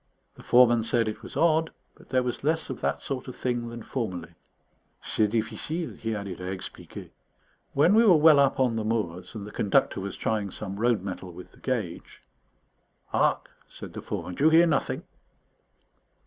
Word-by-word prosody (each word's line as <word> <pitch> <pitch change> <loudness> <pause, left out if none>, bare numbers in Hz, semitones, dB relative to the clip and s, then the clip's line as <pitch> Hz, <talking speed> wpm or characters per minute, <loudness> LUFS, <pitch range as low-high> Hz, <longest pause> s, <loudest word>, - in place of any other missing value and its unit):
The - - -15
foreman 120 -1 +5
said 115 0 +1
it 110 - -4
was - - -8
odd, 160 -1 +3 0.2
but - - -20
there 130 -1 +2
was 125 +1 -3
less 160 +2 0
of - - -7
that - - -1
sort 135 -3 -4
of 130 - -7
thing 120 -2 -2
than 115 -1 -8
formerly. 90 -10 -4 0.7
"C'est 110 - +1
difficile," 115 +10 -2
he 115 -1 -3
added, 100 -4 -6
"à 90 0 -4
expliquer." 95 - -8 0.6
When 150 +7 +4
we 225 +2 +6
were 195 -6 +7
well 155 -1 +7
up 140 -1 +3
on 125 -3 +2
the 110 - -1
moors 105 -4 -3
and 105 -2 -6
the 105 - -9
Conductor 100 -1 +1
was 100 0 -5
trying 105 -3 -1
some 100 +1 -6
road 115 -4 +2
metal 95 -2 -6
with 90 +1 -12
the - - -20
gauge 110 -10 -4 0.9
"Hark!" - - +1 0.2
said - - -10
the - - -6
foreman, 90 - -5
"do 140 - 0
you - - +8
hear 165 +2 +6
nothing?" 150 -5 0
115 Hz, 185 wpm, -27 LUFS, 100-140 Hz, 0.9 s, you